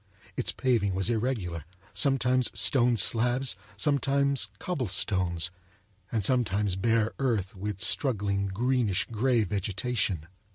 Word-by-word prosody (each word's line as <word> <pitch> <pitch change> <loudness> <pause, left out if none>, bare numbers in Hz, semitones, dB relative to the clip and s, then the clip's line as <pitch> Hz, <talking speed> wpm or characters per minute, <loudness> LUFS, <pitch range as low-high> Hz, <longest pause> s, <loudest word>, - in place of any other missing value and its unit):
Its - - -2
paving 110 -7 0
was 95 +5 +1
irregular, 110 - -2 0.3
sometimes 130 -3 +2
stone 120 +4 +4
slabs, 120 +5 +2 0.2
sometimes 140 -3 +1
cobblestones, 95 - -1 0.6
and 110 -4 0
sometimes 105 -6 +1
bare 110 +2 +1
earth 110 -9 -1
with 100 0 -5
struggling 100 -5 +1
greenish 115 0 0
grey 120 +1 +2
vegetation. 100 -2 -2
110 Hz, 100 wpm, -28 LUFS, 95-125 Hz, 0.6 s, stone